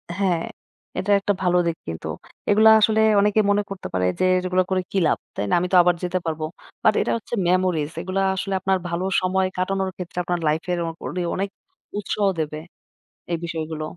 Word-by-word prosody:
হ্যাঁ, 185 -4 +1 0.6
এটা 190 +2 -1
একটা 205 +1 0
ভালো 180 -1 +3
দিক 165 - -1
কিন্তু 80 -1 -5 0.4
এগুলা 215 +2 +6
আসলে 220 0 +3 0.2
অনেকে 210 +1 +3
মনে 205 0 +3
করতে 195 -1 -6
পারে 90 0 +1
যে, - - +2 0.2
এগুলা 185 0 +2
করে 185 -1 +1
কি - - -1
লাভ, - - +2 0.2
তাই 100 - -2
না? - - 0
আমি 180 - -1
তো - - +7
আবার 175 -1 +3
যেতে 180 +1 0
পারব। 160 -1 -3 0.4
বাট 215 - +5
এটা - - 0
হচ্ছে 230 - -11
মেমোরিজ 180 -4 +1
এগুলা 190 +1 -1
আসলে 195 +1 -3
আপনার 190 +1 +1
ভালো 170 +2 -2 0.2
সময় 185 +1 +1
কাটানোর 190 +1 0
ক্ষেত্রে 180 -1 -8
আপনার 175 -1 -1
লাইফের 160 +4 0
অ - - -3 0.2
অডে 180 - -3
অনেক 195 +1 -1 0.5
উৎসাহ 205 0 0
দেবে, 155 -1 -2 0.7
এই 170 - +1
বিষয়গুলো। 160 -1 -4
185 Hz, 190 wpm, -23 LUFS, 170-195 Hz, 0.7 s, তো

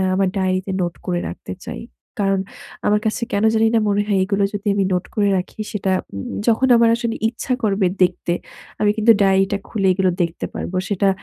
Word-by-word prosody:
আমার 195 0 +2
ডায়েরিতে 185 0 0
নোট 175 -1 -1
করে 175 -1 -1
রাখতে 90 +1 -7
চাই। - - -6 0.4
কারণ 195 -1 +2 0.5
আমার 210 0 +3
কাছে 220 +2 0
কেনো 205 +2 +2
জানি 225 0 +4
না - - +5
মনে 205 0 +2
হয় 205 -2 +2
এগুলো 200 +1 0
যদি 205 +1 -4
আমি 200 - +2
নোট 180 - -1
করে 205 -1 +2
রাখি 180 +4 -6
সেটা 195 -2 -1 0.2
উম 100 0 -5
উম - - -5
যখন 235 +3 +3
আমার 230 0 +5
আসলে 235 -1 -2
ইচ্ছা 245 +2 -3
করবে 195 -3 +2
দেখতে 180 -1 +2 0.5
আমি 210 - +3
কিন্তু 220 +1 +5
ডায়েরিটা 195 +1 +3
খুলে 195 -3 0
এগুলো 185 -1 +2
দেখতে 170 0 -2
পারবো। 185 - -5
সেটা 200 -1 +1
195 Hz, 200 wpm, -20 LUFS, 185-215 Hz, 0.5 s, না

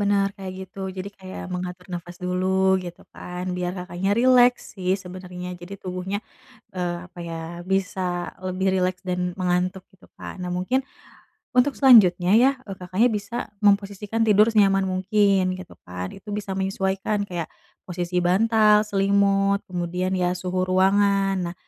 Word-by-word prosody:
benar 200 -1 +2
kayak 190 -2 -6
gitu, 190 +1 -17 0.2
jadi 185 +2 -4
kayak 190 -1 -9
mengatur 180 0 -5
nafas 175 0 -6
dulu 180 +1 -1 0.3
gitu 175 -1 -9
kan, 180 0 -7
biar 180 0 -2
Kakaknya 180 +2 -3
rileks 245 0 +4
sih 185 -1 -1
sebenarnya 180 0 -8
jadi 185 +3 -8
tubuhnya, 185 +2 -3 0.6
eee, 175 -1 -1
apa 180 - -18
ya, 165 - -5 0.4
bisa 195 0 0 0.5
lebih 185 +1 -2
rileks 185 -1 0
dan 180 0 -1 0.2
mengantuk, 180 +1 0
gitu 185 - -20
kan. 185 - -8
Nah 180 - -4
mungkin, 240 +9 +1 0.8
untuk 260 +3 +4
selanjutnya 195 -9 +6
ya, 260 +3 +6 0.2
e - - -6
Kakaknya 185 +7 +2
bisa 200 +3 -7 0.3
memposisikan 205 +2 +1
tidur 210 +1 +6
senyaman 195 -2 +4
mungkin, 195 +1 +2 0.2
gitu 185 - -11
kan. 90 +1 -5
Itu 205 - -15
bisa 205 -2 -5
menyesuaikan 195 +2 -1
kayak, 175 -3 -4 0.4
posisi 180 0 -4
bantal, 210 +3 +4
selimut, 200 0 +2
kemudian 180 +1 -2
ya 180 -1 +1
suhu 185 0 -2
ruangan. 195 +1 +3 0.2
Nah, - - -17
190 Hz, 145 wpm, -24 LUFS, 180-200 Hz, 0.8 s, selanjutnya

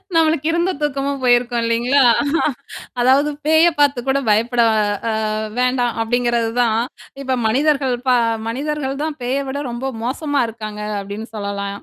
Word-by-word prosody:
நம்மளுக்கு 315 -2 +2
இருந்த 345 +2 +1
தூக்கமும் 280 -1 -2
போயிருக்கும் 245 -1 +2
இல்லேங்களா! 240 +4 +2 1.0
அதாவது 270 +4 +4 0.2
பேய 320 +2 +5
பார்த்து 285 -3 +3
கூட 270 +1 +2
பயப்பட 235 +3 +2 0.5
அ - - 0 0.5
வேண்டாம் 250 -1 +1
அப்பிடிங்கிறது 240 0 0
தான் 225 -2 +2 0.4
இப்ப 260 -2 -1
மனிதர்கள் 270 +1 +1
ப - - +5 0.4
மனிதர்கள் 275 +2 -3
தான் 310 -1 -3
பேய 255 +3 0
விட 280 +2 -3
ரொம்ப 260 +3 -4
மோசமா 285 +3 -1
இருக்காங்க 215 -2 -7 0.2
அப்பிடின்னு 205 +3 -7
சொல்லலாம். 200 -1 -4
255 Hz, 130 wpm, -19 LUFS, 230-285 Hz, 1.0 s, பேய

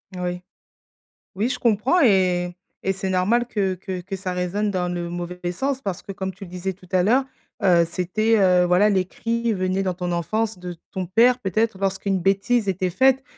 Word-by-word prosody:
Oui. 180 0 -3 0.9
Oui, 220 +6 0
je 250 - -3
comprends 235 - +2
et 180 - +3 0.3
et 195 - +1
c'est 195 0 -4
normal 215 +7 +2
que 195 -5 0
que 185 0 -6
que 195 +2 -5
ça 190 -1 -4
résonne 180 +4 -1
dans 180 -2 -1
le 175 -1 -3
mauvais 175 0 -4
sens 270 +8 -2
parce 195 -7 -4
que, 195 - -7
comme 190 0 -4
tu 195 +3 -11
le 175 - -13
disais 185 +1 -3
tout 185 0 -19
à 185 - +3
l'heure, 245 +8 +3 0.4
heu, 175 -3 +5
c'était, 215 +6 +1
heu, 180 -2 +4
voilà, 180 +4 +4
les 190 -2 +2
cris 230 +3 -2
venaient 185 0 0
dans 185 -2 -1
ton 180 0 -3
enfance 215 +4 -1
de 180 -1 -6 0.2
ton 185 -2 -4
père, 240 +7 +4
peut-être 215 -1 0
lorsqu'une 195 0 0
bêtise 200 +4 +2
était 185 -1 -1
faite. 265 +4 +3
190 Hz, 195 wpm, -23 LUFS, 180-215 Hz, 0.9 s, heu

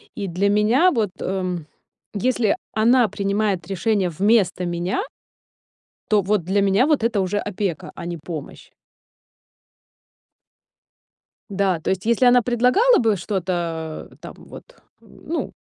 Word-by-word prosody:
и 200 -2 -4
для 185 +3 0
меня 225 - +3
вот, 225 - 0
э, 185 -1 -2 0.6
если 225 0 +1 0.2
она 235 +2 +4
принимает 200 -2 -1
решение 195 0 0
вместо 190 +1 +1
меня 175 +1 -2 1.1
то 210 -1 +4
вот 200 -1 0
для 195 +4 +1
меня 200 +5 +3
вот 300 -7 +2
это 225 -3 +1
уже 190 +2 -1
опека, 195 -5 -4
а - - -8
не 170 0 -4
помощь. 155 -2 -9 2.8
Да, 195 -3 0
то - - -4
есть 190 +1 -2
если 235 +3 +2
она 245 0 +6
предлагала 250 - +3
бы 225 -3 +2
что-то, 170 -4 -3
э, - - -17
там - - -10
вот, - - -12 0.4
м, - - -19
ну, 335 - -3
200 Hz, 135 wpm, -21 LUFS, 180-225 Hz, 2.8 s, она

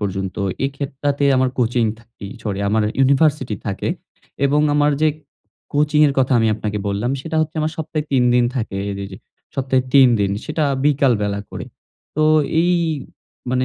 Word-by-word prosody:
পর্যন্ত। 95 -2 -3 0.3
এই 135 - 0
খেতটাতে 140 0 -2
আমার 130 0 +2
কোচিং 120 -1 +2 0.2
থাকি 115 -3 -12 0.2
সরি 100 -3 -3
আমার 110 +1 +2 0.2
ইউনিভার্সিটি 135 -3 +2
থাকে। 100 - -2 0.6
এবং 145 +2 +3
আমার 145 0 +3
যে 155 - +4 0.6
কোচিং 150 +1 +2
এর 140 - +1
কথা 130 0 +2
আমি 115 - +2
আপনাকে 105 -1 -3
বললাম 105 +5 -1
সেটা 160 +3 -4
হচ্ছে 155 +1 -2
আমার 155 +1 -1
সপ্তাহে 155 -1 -3
৩ 130 -2 +3
দিন 125 - +4
থাকে। 110 -5 -3 0.2
রে 100 - -4
যে - - -7 0.4
সপ্তাহে 130 -1 +1
৩ 135 -2 +8
দিন 100 -1 +1
সেটা 155 +1 -2 0.2
বিকাল 140 -3 +3
বেলা 100 0 -1
করে। - - -6 0.5
তো 155 - +2 0.4
এই 175 - +2 0.8
মানে 130 0 +1
130 Hz, 165 wpm, -20 LUFS, 110-150 Hz, 0.8 s, ৩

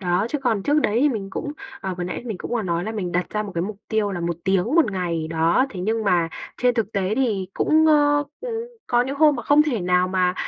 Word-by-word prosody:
Đó, 180 +2 +1
chứ 295 - -2
còn 220 -6 +1
trước 295 +5 +2
đấy 220 -2 +1
thì 295 - +4
mình 205 -7 -4
cũng, 290 - -4 0.3
ờ, 190 -1 -3
vừa 175 - -2
nãy 180 - -5
mình 215 -6 -4
cũng - - -7
vừa 235 -2 0
nói 170 -1 -1
là 220 - -3
mình 185 -5 -3
đặt 180 +1 0
ra 210 0 -1
một 205 - -7
cái 170 - 0
mục 210 +2 -4
tiêu 215 -2 0
là 175 - -4
1 170 -1 -2
tiếng 190 -2 +2
1 320 -10 +4
ngày, 170 -4 -2
đó, 165 +10 +2
thế 185 -6 -6
nhưng 220 +3 -1
mà 175 -4 +2 0.3
trên 245 -1 +2
thực 225 -2 -1
tế 195 +1 0
thì 215 -7 0
cũng, 315 0 +3
ơ, 290 -1 +4 0.2
ừ, 470 -1 -4 0.2
có 240 -1 +3
những 270 +3 -4
hôm 300 -2 +5
mà 240 - -5
không 290 +4 +5
thể 255 -9 -1
nào 180 +1 +2
mà 185 -1 +1
210 Hz, 270 wpm, -23 LUFS, 180-260 Hz, 0.3 s, hôm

